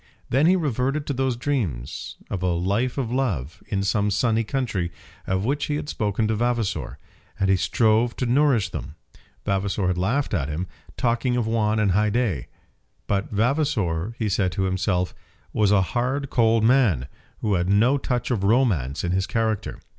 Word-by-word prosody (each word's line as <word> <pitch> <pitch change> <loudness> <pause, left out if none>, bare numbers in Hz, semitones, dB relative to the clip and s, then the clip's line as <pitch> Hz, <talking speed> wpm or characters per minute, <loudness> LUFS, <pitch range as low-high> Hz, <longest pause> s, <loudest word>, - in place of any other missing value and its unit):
Then 140 +5 +4
he 185 - +5
reverted 145 -2 0
to 140 - -2
those 130 -1 0
dreams 100 - -3
of 95 - -4
a 90 - +1
life 100 +10 0
of 125 -4 -2
love, 95 - -2
in 100 -1 -1
some 100 +1 +1
sunny 115 +2 +1
country, 110 -8 -2 0.4
of 95 +2 0
which 140 +3 0
he 150 - -1
had 150 0 -4
spoken 105 -2 0
to 110 - 0
Vavasor, 120 -2 -1 0.4
and 95 0 +2
he - - +5
strove 115 +4 +2
to 125 - -2
nourish 125 -3 +3
them. 75 - -6 0.5
Vavasor 100 0 0
had 90 -1 0
laughed 125 +10 0
at 75 -7 0
him, 80 +5 -2 0.3
talking 125 0 +1
of 120 - 0
Juan 110 -1 +1
and 105 -3 +2
Haidée. 105 - +1 0.6
But 100 -1 -1
Vavasor, 110 - 0
he 110 - -1
said 95 -2 +1
to 95 - -1
himself, 95 -1 0 0.4
was 105 -2 +3
a 100 -2 +4
hard 130 +3 -1
cold 115 -2 +3
man, 110 - +3 0.3
who 105 -2 +1
had 90 0 +1
no 115 +8 +4
touch 125 -1 -2
of 110 -5 0
romance 100 - +2
in 90 - 0
his 95 +1 0
character. 110 -2 -1
110 Hz, 175 wpm, -24 LUFS, 95-125 Hz, 0.6 s, he